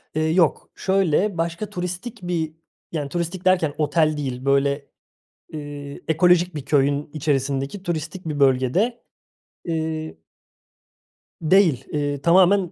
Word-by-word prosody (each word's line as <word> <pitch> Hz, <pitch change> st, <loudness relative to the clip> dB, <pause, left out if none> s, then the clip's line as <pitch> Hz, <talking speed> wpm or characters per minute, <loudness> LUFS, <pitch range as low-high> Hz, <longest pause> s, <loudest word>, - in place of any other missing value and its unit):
Eee, 155 Hz, -, +1 dB
yok, 170 Hz, -4 st, +2 dB
şöyle, 190 Hz, 0 st, +1 dB
başka 170 Hz, +5 st, -2 dB
turistik 180 Hz, +6 st, -5 dB
bir 165 Hz, -3 st, -2 dB, 0.4 s
yani, 145 Hz, -4 st, -3 dB
turistik 175 Hz, +2 st, -3 dB
derken 175 Hz, -6 st, +3 dB
otel 155 Hz, 0 st, +2 dB
değil. 130 Hz, -2 st, -4 dB
Böyle, 140 Hz, +1 st, +1 dB, 0.7 s
ııı, 145 Hz, -1 st, -7 dB
ekolojik 175 Hz, +1 st, +3 dB
bir 145 Hz, -, -5 dB
köyün 145 Hz, 0 st, +1 dB
içerisindeki 140 Hz, +3 st, -1 dB
turistik 170 Hz, +1 st, -4 dB
bir 145 Hz, -2 st, -3 dB
bölgede, 140 Hz, -, +2 dB, 0.6 s
ııı 160 Hz, -, -3 dB, 1.3 s
Değil. 160 Hz, -5 st, +3 dB
Iıı, 145 Hz, -1 st, -1 dB
tamamen 185 Hz, +2 st, +4 dB
160 Hz, 115 wpm, -23 LUFS, 145-180 Hz, 1.3 s, tamamen